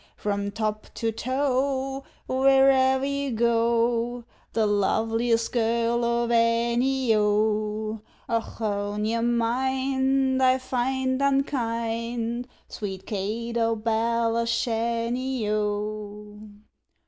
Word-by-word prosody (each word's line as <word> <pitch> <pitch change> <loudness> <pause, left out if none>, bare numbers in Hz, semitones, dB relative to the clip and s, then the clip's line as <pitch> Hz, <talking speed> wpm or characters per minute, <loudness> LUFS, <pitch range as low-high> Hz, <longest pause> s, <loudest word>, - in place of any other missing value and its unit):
From 200 -1 -2
top 215 0 -3
to 225 -1 -1
toe, 265 +2 -1 0.2
where'er 265 0 +4
you 280 0 -2
go, 235 +1 +1 0.3
The 225 -1 +2
loveliest 225 +3 +1
girl 235 0 +1
of 235 0 0
any, 235 +2 +2
O, 215 +1 0 0.3
Ochone! 210 -2 -2
your 230 +1 0
mind 265 +3 +1
I 260 0 +5
find 260 +1 -1
unkind, 235 -3 -1 0.2
Sweet 195 -2 -6
Kate 225 +4 -3
o' 230 -1 +2
Belashanny, 230 +2 0
O! 210 0 -4
230 Hz, 85 wpm, -25 LUFS, 220-260 Hz, 0.3 s, I